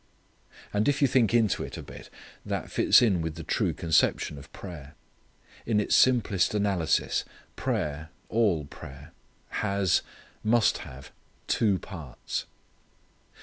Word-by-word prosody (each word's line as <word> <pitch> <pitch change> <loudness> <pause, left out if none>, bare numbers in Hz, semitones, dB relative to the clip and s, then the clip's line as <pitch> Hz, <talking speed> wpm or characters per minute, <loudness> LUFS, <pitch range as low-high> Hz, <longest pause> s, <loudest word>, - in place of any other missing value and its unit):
And 105 +1 +1
if 140 - +1
you 140 - +5
think 120 -4 +3
into 115 -4 +2
it - - -6
a - - -7
bit, - - -11 0.3
this - - -4
fits - - +6
in 95 -7 +2
with 80 -1 -3
the 80 - -7
true - - 0
conception 80 -3 +1
of 70 - -14
prayer. 75 -6 -10 0.7
In 110 -2 +2
its 105 - +2
simplest 110 -7 +3
analysis 95 -7 +1 0.3
prayer 75 +2 -2 0.2
all 100 -10 +1
prayer 70 +2 -11 0.5
has, 100 -3 +2 0.4
must 115 +1 +3
have, 65 +1 -10 0.3
two 105 -4 +2
parts. 80 - -6
95 Hz, 130 wpm, -27 LUFS, 80-110 Hz, 0.7 s, fits